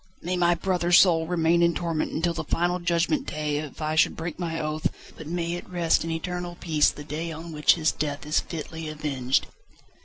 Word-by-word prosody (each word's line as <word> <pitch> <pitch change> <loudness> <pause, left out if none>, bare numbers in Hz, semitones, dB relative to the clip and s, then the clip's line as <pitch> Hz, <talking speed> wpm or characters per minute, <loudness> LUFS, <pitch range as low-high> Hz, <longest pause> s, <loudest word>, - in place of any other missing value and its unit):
"May 180 +2 -1
my 175 -1 +3
brother's 175 0 +3
soul 165 -4 +4
remain 170 0 +2
in 170 0 +3
torment 165 -3 -1
until 170 +1 0
the 165 - -3
final 175 +1 0
Judgment 175 - 0
Day 150 -1 -2
if 150 0 -6
I 155 0 0
should 160 - +3
break 165 +1 -5
my 165 -2 -2
oath, 155 0 -1 0.3
but 160 - -9
may 170 0 -2
it 175 - -6
rest 170 -3 +2
in 165 - -4
eternal 175 +2 -4
peace 155 -3 +3
the 145 - -8
day 155 +3 -4
on 165 +1 -7
which 150 -1 +4
his 160 -2 +2
death 145 -1 -3
is 150 +1 +2
fitly 160 -1 -6
avenged." 140 -4 0
165 Hz, 205 wpm, -26 LUFS, 155-175 Hz, 0.3 s, soul